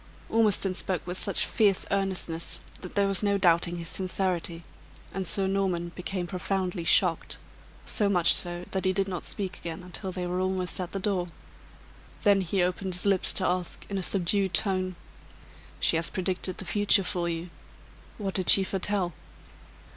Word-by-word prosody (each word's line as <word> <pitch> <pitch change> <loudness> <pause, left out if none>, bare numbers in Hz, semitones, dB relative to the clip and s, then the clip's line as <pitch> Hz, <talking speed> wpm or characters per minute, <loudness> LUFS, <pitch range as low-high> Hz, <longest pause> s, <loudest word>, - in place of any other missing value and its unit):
Ormiston 210 -4 +3
spoke 185 0 -2
with 180 +1 -2
such - - +1
fierce 205 -4 +2
earnestness, 190 -4 -1 0.2
that 180 - -9
there 200 -1 +3
was 195 -2 0
no 200 -1 +2
doubting 175 -2 +3
his 170 -1 -5
sincerity; 185 -2 -2 0.5
and 190 -1 -3
Sir 195 +2 +3
Norman 190 -3 0
became 180 0 -3
profoundly 185 0 -2
shocked 165 0 +2 0.5
so 205 -2 +1
much 175 -4 +5
so, 175 0 -2
that 190 - -1
he 185 - +3
did 195 0 0
not 180 -3 -4
speak 190 -2 -4
again 170 +1 -6
until 185 +2 -5
they 180 0 -4
were 180 +1 -2
almost 185 -1 -1
at 180 - -5
the 195 - -2
door. 185 -3 0 1.0
Then 200 -2 +5
he 185 +1 0
opened 185 +1 -1
his 180 - -1
lips 195 -2 +3
to 185 - -1
ask, 180 -1 -2
in 195 - -1
a - - -2
subdued 190 +1 +1
tone: 185 -2 +1 0.8
"She 165 - +3
has 165 0 -1
predicted 185 0 -3
the 190 - -4
future 205 +1 +3
for 175 -2 -2
you 170 +1 -4 0.7
what 195 -3 -3
did 185 -2 +1
she 195 - +10
foretell?" 190 -2 -1
185 Hz, 170 wpm, -28 LUFS, 175-195 Hz, 1.0 s, she